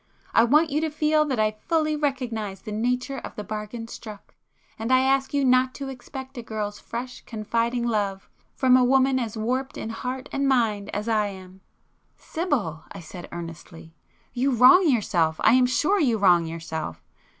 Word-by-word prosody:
I 230 - +6
want 300 +6 +3
you 300 +2 +1
to 320 - 0
feel 305 0 +2
that 270 -4 -2
I 215 0 +2 0.2
fully 310 -2 +1
recognize 240 -9 -3
the 215 - -7
nature 250 +5 -1
of - - -9
the 210 - -5
bargain 215 +2 -6
struck; 215 -3 -10 0.5
and 225 +3 -2
I 255 0 +5
ask 270 0 +1
you 280 -1 +1
not 255 0 +3
to 275 -1 -5
expect 265 0 -9
a - - -4
girl's 210 -2 -5
fresh, 250 +2 -6
confiding 230 +2 -1
love 205 -4 -1 0.3
from 255 -1 +4
a 255 - +5
woman 265 +1 +3
as 225 -3 -4
warped 255 +5 -2
in 225 - -5
heart 255 +3 -5
and 275 0 0
mind 225 -6 +1
as 210 +2 -4
I 215 -2 +2
am!" 190 -1 -11 0.6
"Sibyl,"—I 215 - -3
said 175 +1 -10
earnestly—"You 170 - -6
wrong 300 +9 +7
yourself; 175 - +1
I 220 - +6
am 255 0 +5
sure 370 +10 +2
you 245 -9 +2
wrong 175 -5 +4
yourself! 160 -1 -6
235 Hz, 170 wpm, -25 LUFS, 210-265 Hz, 0.6 s, wrong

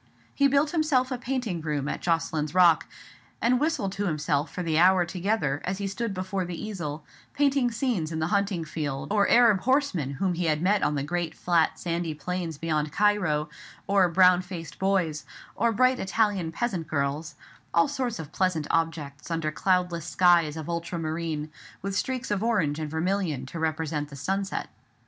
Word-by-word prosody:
He 280 - +4
built 280 +2 +2
himself 300 -6 +1
a 255 - -2
painting 245 -9 -2
room 150 -3 -2
at - - -3
Jocelyn's 165 -2 -1
Rock; 175 -3 +5 0.5
and 245 +1 +2
whistled 285 -10 0
to 200 +1 -2
himself 150 -2 0
for 180 - -4
the 160 -2 +1
hour 180 0 +5
together, 175 -5 -1
as 185 +1 -2
he 200 - -3
stood 225 +3 -3
before 185 0 -2
the 175 -1 -6
easel, 165 -8 -5 0.3
painting 280 -3 +2
scenes 230 - -1
in 160 - -3
the 160 - 0
hunting 200 -4 0
field, 145 -2 -4
or 205 -2 +3
Arab 230 -5 +6
horsemen 235 - +1
whom 180 +6 0
he 175 0 -2
had 155 -2 +1
met 195 +4 +2
on 150 - +1
the 140 - -1
great 170 +1 -2
flat 170 -3 +1
sandy 170 -2 -2
plains 175 -1 -4
beyond 155 -1 -1
Cairo, 185 -7 +2 0.4
or 195 -2 +3
brown 180 +1 +5
faced 180 -3 -8
boys, 180 -6 0 0.3
or 235 - +2
bright 255 +3 +3
Italian 195 -4 0
peasant 185 -4 -2
girls; 145 +2 -2 0.4
all 170 0 +4
sorts 245 -3 -2
of 160 -1 -8
pleasant 180 -4 0
objects, 160 -4 -2
under 165 -2 -1
cloudless 180 -1 0
skies 170 -4 +3
of 155 - -6
ultra 170 0 -3
marine, 160 -1 -3 0.3
with 195 0 -3
streaks 260 +1 -2
of 200 -1 0
orange 175 -11 +1
and 155 -1 -3
vermilion 160 -4 -1
to 165 +5 -7
represent 155 -2 -2
the 140 - -10
sunset. 195 +7 -2
175 Hz, 175 wpm, -27 LUFS, 155-200 Hz, 0.5 s, Arab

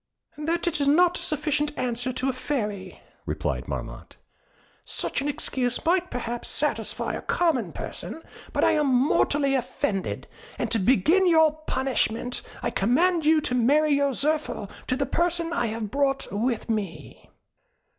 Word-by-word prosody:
"That 330 +3 -1
is 295 -4 +1
not 350 +4 +4
a - - -6
sufficient 295 -1 -1
answer 245 0 -1
to 255 +1 -2
a 265 - +1
Fairy," 210 -8 -4 0.3
replied - - -2
Marmotte. - - -6 0.7
"Such - - -3
an 280 - -2
excuse 265 -3 -2
might 360 +2 +2
perhaps 240 -1 -4
satisfy - - -1
a - - -4
common 325 -9 +1
person, 325 - -6 0.3
but - - 0
I - - +5
am 300 -2 +2
mortally 275 +2 +3
offended; 215 -6 -2 0.3
and - - -2
to 225 - +3
begin 270 - +4
your 320 -2 +6 0.2
punishment, 250 -2 0 0.2
I - - 0
command 320 - +2
you 315 0 +5
to 255 - -1
marry 290 +5 +3
your 280 -1 +2
Zirphil 285 -8 -1 0.2
to 255 - +1
the 275 +1 0
person 340 +1 0
I 240 -8 0
have 220 -1 -4
brought 275 0 +1
with 230 +3 -1
me." 195 - -4
275 Hz, 150 wpm, -26 LUFS, 240-310 Hz, 0.7 s, your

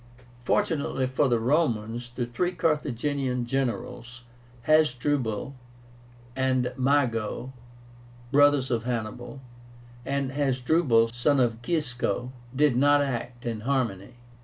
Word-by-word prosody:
Fortunately 145 -6 0
for 130 +3 +1
the 120 -2 +2
Romans, 120 -3 0
the 120 0 -3
three 175 +10 -2
Carthaginian 140 -5 -1
generals, 120 -2 -3 0.4
HASDRUBAL 140 -5 +1 0.8
and 130 -1 0
MAGO, 130 -2 0 0.8
brothers 145 -2 +4
of 115 -2 +1
Hannibal, 120 +2 -4 0.6
and 140 0 -2
HASDRUBAL, 130 -3 +2
son 135 +4 +2
of 120 -2 +1
Gisco, 125 - -2 0.2
did 145 -2 +3
not 145 +3 +4
act 120 -2 -4
in 115 -2 -3
harmony. 120 -3 -2
130 Hz, 100 wpm, -26 LUFS, 120-145 Hz, 0.8 s, brothers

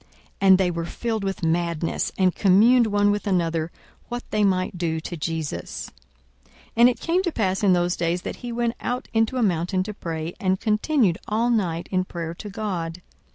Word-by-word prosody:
42:006:011 - - -31 0.3
And 190 -1 +7
they 185 -2 +1
were 170 -1 -3
filled 220 +3 -3
with 195 -2 -3
madness; 165 0 0
and 185 -2 +3
communed 225 +5 +5
one 205 -1 +3
with 205 +1 -2
another 165 -3 0 0.4
what 240 +1 -4
they 210 -1 +2
might 185 -2 +1
do 165 -2 -1
to 170 +2 -6
Jesus. 160 -1 -4 0.8
42:006:012 - - -33
And 240 +1 +8
it 250 - -3
came 345 +2 +1
to 355 -2 -1
pass 190 -8 0
in 200 -3 +4
those 175 0 +1
days, 170 +1 -1
that - - -5
he 245 -1 -6
went 235 0 0
out 250 +2 -3
into 225 +3 +1
a 245 - +2
mountain 185 -1 +1
to 210 - -6
pray, 165 -3 -5
and 185 -1 +1
continued 215 - +2
all 230 +3 +1
night 175 -7 0
in 185 -1 +1
prayer 170 -2 -5
to 205 +4 -8
God. 180 -5 -4
190 Hz, 200 wpm, -24 LUFS, 170-220 Hz, 0.8 s, And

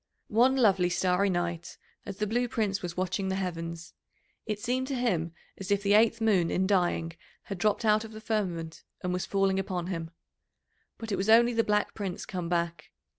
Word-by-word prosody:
One 250 +4 +5
lovely 195 -8 +3
starry 180 +2 +2
night, 175 -2 -3 0.3
as 195 - -6
the 210 - 0
Blue 240 +4 0
Prince 210 -4 -1
was 175 -1 -6
watching 185 +1 -1
the 190 - -1
heavens, 170 -3 -5 0.5
it 210 -1 -2
seemed 250 +3 -1
to 275 - -2
him 185 -10 0 0.3
as 195 - -6
if 200 0 +1
the 200 0 +3
eighth 225 +2 +4
moon 200 -7 +2
in 190 - +1
dying 175 -4 +1 0.3
had 195 -3 -6
dropped 215 +3 +1
out 215 0 +4
of 225 - -9
the 215 - -9
firmament 185 -7 -3 0.2
and 180 0 -1
was 180 - -2
falling 195 -1 +1
upon 185 -2 -3
him. 165 -1 -5 0.9
But 225 -1 -7
it 195 - 0
was 195 +3 -1
only 235 +2 +6
the 230 0 +2
Black 210 -1 0
Prince 195 -4 -5
come 180 -3 -4
back. 170 -2 -2
195 Hz, 195 wpm, -29 LUFS, 175-220 Hz, 0.9 s, only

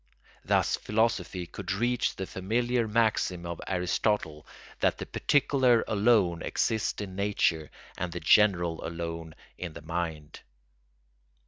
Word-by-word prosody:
Thus - - +2
philosophy 105 -5 0
could 85 - -6
reach 120 +5 0
the 95 - -4
familiar 115 +6 -1
maxim 105 -5 +1
of 85 0 -5
Aristotle 90 -3 -1 0.3
that - - +2
the - - -5
particular 130 -5 +2
alone 100 -5 +3
exists 110 -2 -1
in 95 -2 -8
nature 95 -6 0 0.3
and 90 -1 -2
the 90 - -4
general 85 -1 +3
alone 85 -1 -5 0.2
in 90 -3 -5
the - - -10
mind. 80 -2 -4
95 Hz, 120 wpm, -28 LUFS, 85-110 Hz, 0.3 s, alone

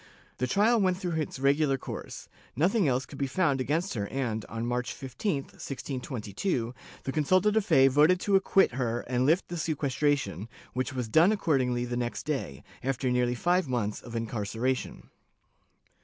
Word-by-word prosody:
The 125 - 0
trial 215 - +3
went 185 -2 +2
through 175 -4 -2
its 150 - -5
regular 140 +1 +2
course; - - -7 0.3
nothing 180 - +2
else 130 0 +1
could 140 - -11
be 140 - 0
found 140 -2 +1
against 160 +8 -1
her 100 -3 -2
and, 115 -4 -2
on 115 +1 -4
March 125 0 -2
15, 135 - -2
1622, 125 - -4 0.3
the 135 - -2
consulta 185 +8 +3
de 220 - +3
fe 135 -10 +5
voted 150 +7 +4
to 200 - +2
acquit 195 0 +4
her 120 -1 -1
and 125 +1 0
lift 165 +5 +3
the 175 - -4
sequestration, 145 - -1 0.2
which 130 +1 -2
was 125 -3 -2
done 160 - +5
accordingly 130 - +1
the 120 0 -3
next 120 -1 -3
day, 135 - -3 0.2
after 130 -1 -1
nearly 125 0 +1
five 175 +5 +1
months 115 -5 -2
of 120 -1 -9
incarceration. 115 +3 -3
135 Hz, 165 wpm, -28 LUFS, 120-165 Hz, 0.3 s, fe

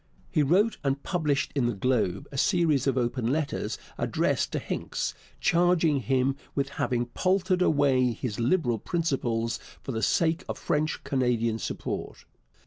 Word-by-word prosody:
He 155 - +2
wrote 190 +10 +3
and 140 0 -1
published 150 -6 0
in 135 -4 +1
the 120 - -1
Globe 125 +3 0
a - - -8
series 160 - +2
of 135 -1 +1
open 120 -1 0
letters 150 0 -1 0.2
addressed - - 0
to - - 0
Hincks, - - -3 0.3
charging 170 -4 +3
him 135 +1 +1 0.2
with 140 -1 0
having 120 -3 -1
paltered 185 +7 +1
away 140 -6 +3
his 110 -1 -4
Liberal 120 - +1
principles 120 - -1 0.2
for - - -4
the 110 -2 -2
sake 165 +8 +2
of - - -3
French 150 +1 -1
Canadian 120 -4 0
support. - - -5
140 Hz, 145 wpm, -27 LUFS, 120-160 Hz, 0.3 s, wrote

